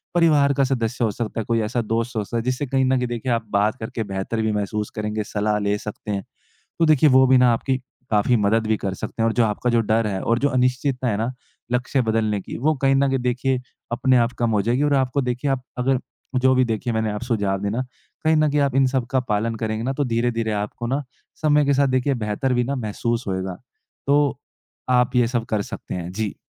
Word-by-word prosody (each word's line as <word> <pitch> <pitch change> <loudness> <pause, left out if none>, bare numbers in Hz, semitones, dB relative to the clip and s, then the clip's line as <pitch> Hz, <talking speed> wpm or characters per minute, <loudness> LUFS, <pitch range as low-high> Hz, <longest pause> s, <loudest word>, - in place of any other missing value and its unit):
परिवार 150 -5 +4
का 140 - +2
सदस्य 125 -2 -1
हो 110 - +2
सकता 115 +1 -4
है, - - -6
कोई 115 +1 +1
ऐसा 110 +3 -1
दोस्त 115 +2 -2
हो 110 - 0
सकता 115 +4 -4
है 115 - -1
जिससे 130 +3 -1
कहीं 135 +1 +1
न 130 0 +2
कहीं 125 -1 -1
देखिए 120 +1 -3
आप 115 -1 0
बात 105 +2 +2
करके 110 +1 -4
बेहतर 100 +3 -3
भी 110 0 +1
महसूस 105 0 -2
करेंगे, 105 0 -2
सलाह 105 0 -1
ले 100 0 0
सकते 105 0 -7
हैं। 100 -1 -2 0.6
तो 165 - +4
देखिए 155 -1 +5
वो 130 0 +6
भी 130 0 +5
ना 125 -1 +5
आपकी 130 +3 0 0.3
काफ़ी 110 +3 +3
मदद 110 +1 +2
भी 110 0 +2
कर 95 -2 -3
सकते 115 - -4
हैं - - +3
और - - 0
जो 120 - +3
आपका 110 +3 0
जो 120 -1 +3
डर 110 0 +1
है 95 -2 -2
और 115 +1 +1
जो 145 - +2
अनिश्चितता 130 0 0
है 105 - 0
ना 115 +4 -1 0.4
लक्ष्य 125 +2 +1
बदलने 110 -2 0
की - - -7
वो 155 +5 +2
कहीं 135 0 +4
न 140 +1 +3
कहीं 135 0 +1
देखिए 125 +1 0 0.3
अपने 130 +2 +3
आप 120 +1 +2
कम 120 -1 +1
हो 105 -2 +2
जाएगी 120 +6 +1
और 145 -1 +2
आपको 135 0 +1
देखिए 125 +3 -1
आप 135 -2 -1 0.2
अगर 130 0 +1 0.4
जो 130 +1 +4
भी 130 0 +4
देखिए 115 +1 -2
मैंने 110 -1 0
आप 105 +2 -5
सुझाव 100 -6 0
दिए 100 0 -1
ना, 120 +5 -1 0.4
कहीं 160 0 +4
न 155 -1 +3
कहीं 145 +1 +1
आप 140 -2 +1
इन 135 0 +5
सबका 130 0 0
पालन 115 -1 -1
करेंगे 110 0 -1
ना 130 - 0
तो 145 +1 -1
धीरे-धीरे 115 -2 0
आपको 105 +3 -3
ना 135 +4 -1 0.4
समय 150 -1 +4
के 140 - +3
साथ 140 0 +3
देखिए 135 +2 +1
बेहतर 110 +3 -1
भी 120 0 +2
ना 140 +3 -2
महसूस 115 +1 -2
होगा। 95 -1 -2 0.5
तो 145 -1 +2 0.6
आप 125 +1 +1
ये 120 -1 +4
सब 120 -1 -1
कर 105 -2 0
सकते - - -6
हैं, 90 -1 -4
जी। 105 0 -3
120 Hz, 240 wpm, -22 LUFS, 110-130 Hz, 0.6 s, वो